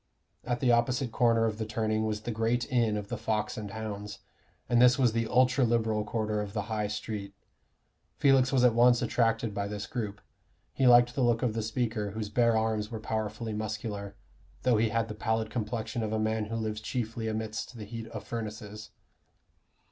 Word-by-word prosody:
At 120 Hz, -1 st, -2 dB
the 125 Hz, -, +4 dB
opposite 120 Hz, +1 st, +1 dB
corner 115 Hz, -2 st, +3 dB
of 110 Hz, -1 st, -2 dB
the 110 Hz, -, -1 dB
turning 110 Hz, 0 st, 0 dB
was 105 Hz, -1 st, -2 dB
the 120 Hz, -, -4 dB
great 115 Hz, +2 st, 0 dB
inn 115 Hz, -4 st, +2 dB
of 100 Hz, -1 st, -6 dB
the -, -, -4 dB
Fox 105 Hz, -1 st, -1 dB
and 105 Hz, -2 st, -5 dB
Hounds, 105 Hz, -1 st, -6 dB, 0.5 s
and 120 Hz, 0 st, +3 dB
this 125 Hz, 0 st, +6 dB
was 125 Hz, -4 st, +3 dB
the 115 Hz, 0 st, 0 dB
ultra 125 Hz, +2 st, +3 dB
Liberal 110 Hz, -2 st, +1 dB
quarter 105 Hz, 0 st, -1 dB
of 100 Hz, -1 st, -6 dB
the 105 Hz, -, -1 dB
High 105 Hz, -1 st, -2 dB
street. 105 Hz, -1 st, -5 dB, 0.8 s
Felix 135 Hz, -2 st, +4 dB
was 130 Hz, -2 st, +3 dB
at 125 Hz, -2 st, +6 dB
once 120 Hz, +1 st, +5 dB
attracted 115 Hz, -2 st, +1 dB
by 100 Hz, 0 st, -2 dB
this 105 Hz, 0 st, -5 dB
group; 105 Hz, -4 st, -4 dB, 0.5 s
he 135 Hz, -, +2 dB
liked 120 Hz, 0 st, +7 dB
the 135 Hz, -, -1 dB
look 120 Hz, -1 st, +2 dB
of 120 Hz, -3 st, +1 dB
the 115 Hz, -, -1 dB
speaker, 110 Hz, -1 st, -2 dB
whose 105 Hz, 0 st, -4 dB
bare 115 Hz, +1 st, +3 dB
arms 110 Hz, -1 st, 0 dB
were 115 Hz, -2 st, -5 dB
powerfully 110 Hz, +1 st, -3 dB
muscular, 105 Hz, -2 st, -4 dB, 0.5 s
though 125 Hz, -3 st, +4 dB
he 110 Hz, +1 st, +2 dB
had 115 Hz, 0 st, 0 dB
the 110 Hz, -, -5 dB
pallid 110 Hz, 0 st, -1 dB
complexion 115 Hz, +1 st, -3 dB
of 110 Hz, -1 st, -2 dB
a -, -, +1 dB
man 110 Hz, 0 st, 0 dB
who 115 Hz, +2 st, -5 dB
lives 110 Hz, -1 st, -3 dB
chiefly 115 Hz, -1 st, -3 dB
amidst 110 Hz, +2 st, -4 dB
the 105 Hz, -, -7 dB
heat 115 Hz, +1 st, -7 dB
of 105 Hz, -3 st, -7 dB
furnaces. 105 Hz, -1 st, -6 dB
110 Hz, 195 wpm, -29 LUFS, 105-120 Hz, 0.8 s, liked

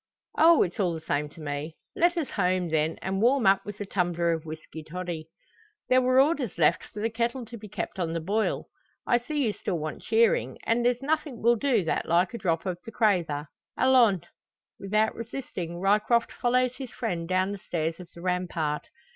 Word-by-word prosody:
"Oh! 330 Hz, 0 st, +6 dB
it's 175 Hz, -, -5 dB
all 180 Hz, -4 st, +1 dB
the -, -, -5 dB
same 150 Hz, -1 st, -2 dB
to 160 Hz, -, -16 dB
me. 145 Hz, +2 st, -4 dB, 0.2 s
Let 345 Hz, +1 st, +3 dB
us 315 Hz, -5 st, -2 dB
home, 180 Hz, -3 st, +1 dB
then, 160 Hz, 0 st, 0 dB
and 190 Hz, +1 st, -1 dB
warm 250 Hz, 0 st, +3 dB
up 195 Hz, 0 st, +5 dB
with 205 Hz, 0 st, -8 dB
a -, -, -2 dB
tumbler 175 Hz, -3 st, 0 dB
of 165 Hz, -1 st, -3 dB
whisky 160 Hz, 0 st, -8 dB
toddy. 165 Hz, -1 st, -6 dB, 0.6 s
There 255 Hz, 0 st, +5 dB
were 255 Hz, +1 st, +4 dB
orders 275 Hz, -, +2 dB
left 165 Hz, +2 st, +3 dB
for 210 Hz, -, -8 dB
the 225 Hz, -, +1 dB
kettle 235 Hz, +2 st, -1 dB
to 235 Hz, -, -10 dB
be 215 Hz, -2 st, -9 dB
kept 190 Hz, -, -5 dB
on 165 Hz, -2 st, -1 dB
the 165 Hz, -, -1 dB
boil. 205 Hz, +7 st, -1 dB, 0.4 s
I 240 Hz, -, +3 dB
see 285 Hz, +3 st, -1 dB
you 215 Hz, -, 0 dB
still 185 Hz, -3 st, -3 dB
want 155 Hz, -1 st, -5 dB
cheering, 225 Hz, 0 st, +2 dB
and 235 Hz, +1 st, +1 dB
there's 245 Hz, +1 st, +1 dB
nothing 300 Hz, -5 st, -1 dB
will 235 Hz, +1 st, +5 dB
do 235 Hz, -4 st, +2 dB
that 160 Hz, -, -1 dB
like 175 Hz, +4 st, +2 dB
a 235 Hz, -, -5 dB
drop 165 Hz, -3 st, 0 dB
of 180 Hz, -2 st, -3 dB
the 225 Hz, -, -9 dB
crather. 175 Hz, -10 st, +1 dB, 0.3 s
Allons!" 240 Hz, -9 st, +4 dB, 0.6 s
Without 215 Hz, +3 st, +1 dB
resisting, 215 Hz, -8 st, -6 dB
Ryecroft 210 Hz, +5 st, +2 dB
follows 250 Hz, +1 st, +1 dB
his 265 Hz, -3 st, -6 dB
friend 175 Hz, -9 st, -3 dB
down 185 Hz, +1 st, +1 dB
the 205 Hz, -, -5 dB
stairs 165 Hz, -2 st, -3 dB
of 180 Hz, -2 st, -10 dB
the 170 Hz, -, -10 dB
rampart. 175 Hz, -4 st, -1 dB
195 Hz, 200 wpm, -27 LUFS, 170-240 Hz, 0.6 s, Oh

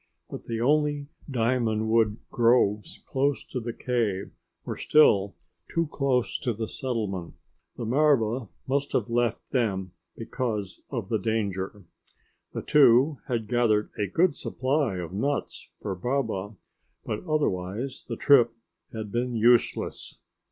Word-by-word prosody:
But -, -, -7 dB
the 115 Hz, -1 st, -3 dB
only 145 Hz, +2 st, +1 dB, 0.2 s
diamond 115 Hz, -3 st, +1 dB
wood 110 Hz, -1 st, +3 dB
groves 115 Hz, -3 st, +2 dB
close 140 Hz, +1 st, 0 dB
to 130 Hz, -, -4 dB
the 120 Hz, 0 st, -4 dB
cave 115 Hz, -6 st, -1 dB, 0.3 s
were -, -, -3 dB
still 100 Hz, -10 st, +4 dB, 0.4 s
too 165 Hz, 0 st, +1 dB
close 130 Hz, -4 st, 0 dB
to 120 Hz, -, -1 dB
the 110 Hz, +1 st, -4 dB
settlement. 105 Hz, -10 st, -3 dB, 0.4 s
The 120 Hz, -, -4 dB
marva 125 Hz, -3 st, +2 dB, 0.2 s
must 140 Hz, +1 st, -1 dB
have 115 Hz, -, 0 dB
left 120 Hz, -1 st, 0 dB
them 95 Hz, -7 st, 0 dB, 0.3 s
because 110 Hz, -4 st, -3 dB
of 115 Hz, -8 st, -4 dB
the 110 Hz, -, +1 dB
danger. 100 Hz, -2 st, -2 dB, 0.7 s
The -, -, -5 dB
two 135 Hz, +1 st, +5 dB
had 115 Hz, -3 st, -1 dB
gathered 110 Hz, -3 st, +2 dB
a 105 Hz, -, -1 dB
good 165 Hz, -, +2 dB
supply 130 Hz, -3 st, -1 dB
of 90 Hz, -1 st, -5 dB
nuts 140 Hz, +8 st, -2 dB
for 100 Hz, -, -2 dB
Baba, 110 Hz, -2 st, -2 dB, 0.5 s
but 105 Hz, -, -3 dB
otherwise 125 Hz, -, -2 dB
the -, -, -3 dB
trip 120 Hz, -5 st, +5 dB, 0.4 s
had 110 Hz, -2 st, -6 dB
been 120 Hz, +2 st, -1 dB
useless. 120 Hz, +1 st, +2 dB
115 Hz, 130 wpm, -27 LUFS, 105-130 Hz, 0.7 s, two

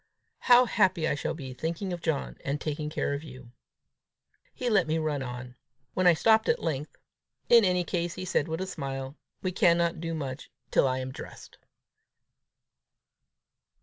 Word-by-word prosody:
How 250 Hz, 0 st, +6 dB
happy 185 Hz, -7 st, +2 dB
I -, -, +1 dB
shall 145 Hz, -, -3 dB
be, 135 Hz, -5 st, -7 dB
thinking 170 Hz, +7 st, -3 dB
of 175 Hz, -, -5 dB
John, 160 Hz, -5 st, -2 dB
and 140 Hz, +1 st, -2 dB
taking 150 Hz, 0 st, -3 dB
care 150 Hz, -2 st, -1 dB
of 140 Hz, +2 st, -4 dB
you!" 130 Hz, -5 st, -12 dB, 1.0 s
He 250 Hz, -, -4 dB
let 200 Hz, -8 st, +3 dB
me 155 Hz, +1 st, +1 dB
run 155 Hz, -3 st, -1 dB
on. 125 Hz, -1 st, -6 dB, 0.4 s
When 185 Hz, -1 st, +2 dB
I 175 Hz, -, +7 dB
stopped 220 Hz, +6 st, +4 dB
at -, -, +4 dB
length 150 Hz, -2 st, -3 dB, 0.5 s
"In 235 Hz, -1 st, +8 dB
any 180 Hz, -2 st, +2 dB
case," 175 Hz, -1 st, -2 dB
he 185 Hz, -, -5 dB
said 155 Hz, -3 st, 0 dB
with 160 Hz, +2 st, -3 dB
a -, -, -1 dB
smile, 135 Hz, -6 st, -5 dB, 0.3 s
"we 185 Hz, -, 0 dB
cannot 170 Hz, -3 st, +2 dB
do 165 Hz, -1 st, -3 dB
much 135 Hz, -3 st, -5 dB, 0.2 s
till -, -, +4 dB
I 130 Hz, 0 st, 0 dB
am 130 Hz, 0 st, -4 dB
dressed!" -, -, -11 dB
160 Hz, 170 wpm, -28 LUFS, 140-180 Hz, 1.0 s, In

